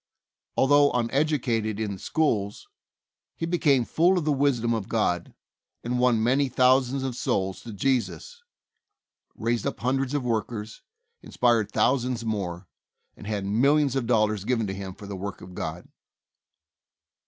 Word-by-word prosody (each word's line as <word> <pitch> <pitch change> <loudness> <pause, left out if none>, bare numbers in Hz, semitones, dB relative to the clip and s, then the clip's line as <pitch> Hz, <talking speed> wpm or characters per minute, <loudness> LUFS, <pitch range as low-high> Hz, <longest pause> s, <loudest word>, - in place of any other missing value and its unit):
Although 145 +1 +5
uneducated 120 -4 0
in 110 -2 -2
the 95 - -6
schools, 110 - -1 0.7
he 165 - -3
became 150 -7 +2
full 175 +8 +3
of 170 - -1
the 155 - +2
wisdom 135 -5 +1
of 110 -4 -3
God, 90 -6 -1 0.5
and 125 +1 -1
won 120 -3 +3
many 135 +3 +2
thousands 130 +1 +3
of 130 -2 -3
souls 95 -5 -1
to 115 - -9
Jesus, 135 - -2 0.9
raised 115 0 -1
up - - -4
hundreds 135 +2 0
of 145 - -1
workers, 110 -2 -3 0.4
in - - -13
spired 120 -4 +2
thousands 125 -3 +1
more, 95 -5 -3 0.5
and 105 - -11
had 105 -2 -2
millions 135 +7 +2
of 130 -4 -1
dollars 110 -4 +2
given 115 0 0
to 95 - -3
him 95 -1 -7
for 105 - -11
the 100 0 -6
work 100 +1 -6
of 90 - -11
God. 80 0 -5
120 Hz, 150 wpm, -26 LUFS, 105-135 Hz, 0.9 s, Although